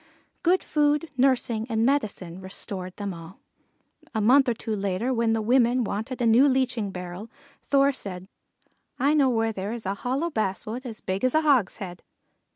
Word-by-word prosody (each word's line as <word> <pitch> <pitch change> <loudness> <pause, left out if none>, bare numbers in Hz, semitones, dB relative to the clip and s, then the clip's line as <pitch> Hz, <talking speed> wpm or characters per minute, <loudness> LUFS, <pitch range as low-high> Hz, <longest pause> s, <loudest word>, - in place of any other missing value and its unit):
Good 360 +2 +2
food, 295 +1 +1
nursing, 245 -4 +1
and 225 0 +1
medicine 200 -10 -1
restored 190 -1 -6
them 200 -2 -4
all. 165 +2 -11 0.8
A - - +1
month 260 +5 +5
or 235 - 0
two 220 -1 -3
later, 200 +5 -1
when 230 -1 +1
the 220 -1 0
women 245 +1 +3
wanted 220 +5 -4
a - - +2
new 235 +5 +6
leaching 255 -5 0
barrel, 180 +3 -7 0.3
Thor 275 0 +3
said: 190 -8 -6 0.7
"I 280 +4 +2
know 285 -4 +4
where 225 -2 +1
there 200 +2 -4
is 235 -3 -7
a 195 - 0
hollow 265 - -2
basswood 220 +3 -3
as 225 -2 -5
big 190 +3 -3
as 255 +2 +2
a 315 - +5
hogshead." 205 -10 +1
230 Hz, 170 wpm, -25 LUFS, 195-260 Hz, 0.8 s, new